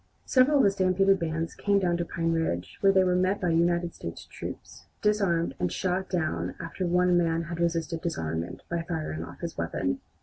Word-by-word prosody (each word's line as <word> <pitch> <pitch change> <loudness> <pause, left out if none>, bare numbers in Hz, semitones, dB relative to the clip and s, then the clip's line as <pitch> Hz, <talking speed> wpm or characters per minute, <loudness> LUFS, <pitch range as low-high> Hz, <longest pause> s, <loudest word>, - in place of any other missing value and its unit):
Several 265 +3 +4
of 275 - +5
the 200 - +5
stampeded 195 0 +3
bands 165 0 -2
came 200 -1 +1
down 180 -3 +2
to 175 - -1
Pine 165 0 -1
Ridge, 130 - -2
where 195 - +6
they 190 -1 +4
were 180 -1 +2
met 185 +2 +2
by 180 - 0
United 170 +1 +2
States 85 - -7
troops, - - -9 0.2
disarmed, 190 -8 +2
and 90 - 0
shot 185 +1 -1
down 170 -4 -1
after 170 +2 -3
one 180 +1 +3
man 165 -1 +2
had 170 0 -6
resisted 165 -1 -1
disarmament 85 - -3
by 170 -1 -2
firing 160 - -4
off - - -11
his - - -5
weapon. - - -1
170 Hz, 195 wpm, -28 LUFS, 165-185 Hz, 0.2 s, where